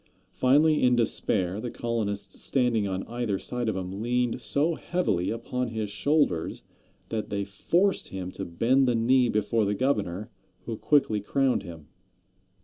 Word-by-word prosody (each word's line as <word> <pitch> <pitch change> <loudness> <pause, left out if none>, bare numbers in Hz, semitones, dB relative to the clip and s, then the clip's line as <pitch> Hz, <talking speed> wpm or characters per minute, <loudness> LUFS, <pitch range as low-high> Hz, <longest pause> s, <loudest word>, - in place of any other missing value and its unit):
Finally, 150 +4 +4
in 125 -1 +4
despair, 105 -4 0
the 120 - -3
colonists 115 -4 -3
standing 120 -6 +1
on 95 0 -2
either 120 -4 -2
side 120 +3 -2
of 105 - -2
him 95 +2 -4
leaned 125 +1 0
so 145 +8 +1
heavily 160 - -1
upon 125 +2 -2
his 110 -3 -4
shoulders 140 - 0 0.5
that 110 -2 -3
they 100 0 -1
forced 175 - +1
him 95 -1 -6
to 95 - -6
bend 125 +10 +2
the 120 - +2
knee 125 +2 +3
before 105 +1 +1
the 105 0 0
governor, 105 -6 -1 0.3
who 115 - -3
quickly 110 -4 +2
crowned 135 +2 +1
him. 85 -5 -10
115 Hz, 150 wpm, -27 LUFS, 100-125 Hz, 0.5 s, Finally